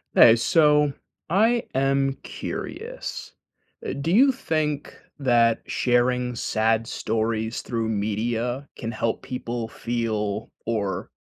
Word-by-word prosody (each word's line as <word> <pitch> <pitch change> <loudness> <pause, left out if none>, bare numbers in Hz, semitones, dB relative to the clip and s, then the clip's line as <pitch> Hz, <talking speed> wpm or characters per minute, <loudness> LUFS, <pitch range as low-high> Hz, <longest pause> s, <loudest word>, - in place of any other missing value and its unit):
Hey, 115 0 +8
so, 150 +2 +4 0.4
I 225 +7 +3
am 135 0 +2
curious. - - -6 0.5
Eh, - - -3
do 140 +4 -3
you 255 +10 +6
think 155 - -2 0.2
that 120 -4 +3
sharing 125 0 +1
sad 115 0 +1
stories 110 +1 -1
through 115 -2 -2
media 115 +5 -1
can 115 - -4
help 115 0 -1
people 120 -2 -4
feel, 110 -3 -2 0.2
or 100 -5 -2
120 Hz, 105 wpm, -24 LUFS, 115-140 Hz, 0.5 s, Hey